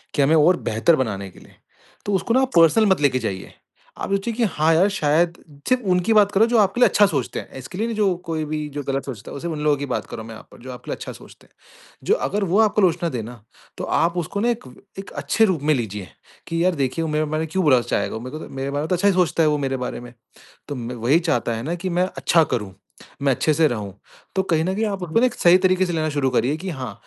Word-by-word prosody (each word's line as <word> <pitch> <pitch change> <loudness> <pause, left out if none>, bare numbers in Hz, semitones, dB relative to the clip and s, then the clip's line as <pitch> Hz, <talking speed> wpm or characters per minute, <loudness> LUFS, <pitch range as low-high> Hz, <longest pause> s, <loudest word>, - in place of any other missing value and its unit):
कि 145 - +2
हमें 150 +4 +4
और 170 +4 +5
बेहतर 115 +10 +3
बनाने 100 -7 -3
के - - -17
लिए, - - -19 0.5
तो 205 - -1
उसको 210 +5 0
ना 260 - +4
आप 265 0 0
पर्सनल 170 +6 +5
मत 190 -5 +2
लेके 130 -3 +2
जाइए। 95 -5 -5 0.5
आप - - -3
सोचिए 200 +4 -1
कि 235 - -1
हाँ, 160 -5 +2
यार 185 +5 +4
शायद 170 -1 +1 0.3
सिर्फ 255 0 +3
उनकी 180 +5 +1
बात 205 -2 +5
कर 200 - +1
रहा 225 - +6
हूँ - - -4
जो 240 - +4
आपके 205 +4 +2
लिए - - +8
अच्छा 205 - +5
सोचते 140 -8 -2
हैं, - - -10
इसके 130 +8 -9
लिए 225 +3 -1
नहीं 230 - -3
जो 195 -4 +2
कोई 160 -2 -2
भी 150 0 -3
जो 145 -1 -4
गलत 135 0 -2
सोचता 115 -6 -8
है, - - -8
वो - - -6
सिर्फ 170 -1 -3
उन 150 - -5
लोगों 150 -1 +3
की 145 - -4
बात 130 - -3
कर - - -7
रहा 110 - -6
हूँ - - -11
मैं 110 - -9
यहाँ - - -14
पर - - -15
जो 130 - -7
आपके 125 - -9
लिए - - -1
अच्छा - - -8
सोचते - - -16
हैं। - - -37 0.5
जो - - +5
अगर 205 +1 -1
वो 190 +5 +2
आपको 215 -1 +2
आलोचना 170 -1 +2
दे 120 -5 -3
ना, 120 0 -10 0.4
तो - - -5
आप 170 +2 +1
उसको 175 +4 -3
ना 240 - +2
एक 230 - -3
व 125 - -13 0.3
एक 195 - -8
अच्छे 225 - +3
रूप 180 -8 0
में 155 +1 +3
लीजिए 105 -6 -4 0.4
कि 165 0 -1
यार 185 -1 +2
देखिए 140 +3 -1
मेरा 155 0 0
मेरा 155 +1 -2
क्यों 185 +4 -1
बुरा 130 -6 +5
चाहेगा - - -2
वो? 110 - -5
मेरे 130 +5 -7
को - - -8
तो - - -13
मेरे 135 +1 -3
बारे 145 - -2
में - - -3
तो 180 - +2
अच्छा 200 +4 +1
ही 200 - +4
सोचता 175 -2 +2
है 155 - +4
वो 150 - +1
मेरे 135 -1 -1
बारे 125 -1 -4
में। 120 0 -11 0.6
तो 145 - -4
म 120 0 -5
वही 125 +6 +2
चाहता 155 -9 -1
है 115 - -5
ना 165 +6 -3
कि 175 +2 -4
मैं 180 +1 +1
अच्छा 165 -2 +3
करूँ, 105 -8 -4 0.5
मैं 135 -1 +3
अच्छे 155 - +1
से 160 +1 +4
रहूँ। 105 -6 -4 0.4
तो 190 - +3
कहीं 165 -4 0
न 185 +2 -1
कहीं 220 +2 -1
आप 200 -2 -3
उसको 175 +3 0
एक 250 - -2
सही 175 +1 +6
तरीके 185 0 +2
से 175 - -3
लेना 155 -1 -1
शुरू 145 -2 0
करिए 130 +4 +1
कि 185 +3 -6
हाँ, 130 -7 -5
160 Hz, 295 wpm, -22 LUFS, 135-185 Hz, 0.6 s, लिए